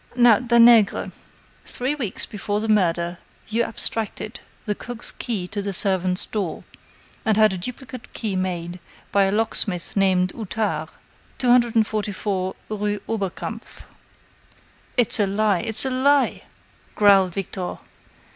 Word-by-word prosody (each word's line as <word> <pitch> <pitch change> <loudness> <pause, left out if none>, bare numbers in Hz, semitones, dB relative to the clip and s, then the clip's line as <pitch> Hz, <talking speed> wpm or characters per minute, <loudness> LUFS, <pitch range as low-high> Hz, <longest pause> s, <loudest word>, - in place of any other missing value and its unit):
Now, 240 -3 +6
Danègre, 235 -3 +5 0.5
three 255 +3 -2
weeks 245 -10 -3
before 205 -1 -3
the 220 - -3
murder, 175 -4 +1 0.3
you 225 +2 +1
abstracted 220 -1 -2 0.3
the 210 - 0
cook's 240 +3 -6
key 205 -7 -4
to 205 0 -3
the 200 0 -3
servants' 185 -2 +1
door, 200 -6 -4 0.6
and 220 -2 +2
had 215 -2 +5
a - - -3
duplicate 250 +3 -7
key 210 -4 -3
made 180 -1 -3 0.3
by 200 -1 +4
a 195 - +1
locksmith 205 -5 0
named 185 -2 +2
Outard, 220 0 -2 0.5
244 215 -6 +1
rue 210 -1 -2
Oberkampf." 200 -5 -5 1.1
"It's 240 -2 +3
a 205 - +3
lie 200 -1 +1
it's 225 +5 -2
a 265 - -1
lie!" 275 +2 +2 0.5
growled 195 -3 +5
Victor. 190 -1 -4
210 Hz, 125 wpm, -23 LUFS, 190-230 Hz, 1.1 s, Now